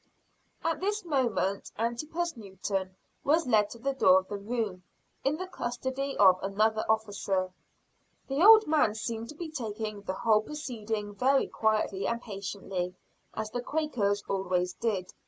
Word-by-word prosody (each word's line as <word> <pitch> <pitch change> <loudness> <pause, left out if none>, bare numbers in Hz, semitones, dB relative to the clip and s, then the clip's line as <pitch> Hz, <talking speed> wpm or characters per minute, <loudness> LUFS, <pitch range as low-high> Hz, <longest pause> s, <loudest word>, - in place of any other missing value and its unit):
At 325 -2 0
this 415 +1 -1
moment 240 - 0
Antipas 305 +10 -2
Newton 190 -3 -4 0.3
was 315 +3 +3
led 215 -4 +3
to - - -9
the 275 +4 -1
door 185 -8 +6
of 185 - -22
the 205 - -4
room, 210 -3 -3 0.4
in 280 +3 +1
the 370 - -4
custody 265 -3 -3
of 185 -2 +6
another 215 +3 +1
officer. 200 -4 0 0.8
The 275 +5 +1
old 435 +1 +9
man 295 -9 +3
seemed 225 +1 -4
to 300 - -8
be 320 0 -6
taking 215 -6 -4
the 190 -2 -4
whole 215 0 +3
proceeding 220 -7 -4
very 265 +6 +3
quietly 215 -3 0
and 235 0 -1
patiently, 195 -4 -4 0.4
as 215 0 -3
the 245 - -2
Quakers 245 -9 0
always 180 -2 0
did. 200 -6 -2
220 Hz, 150 wpm, -29 LUFS, 200-275 Hz, 0.8 s, old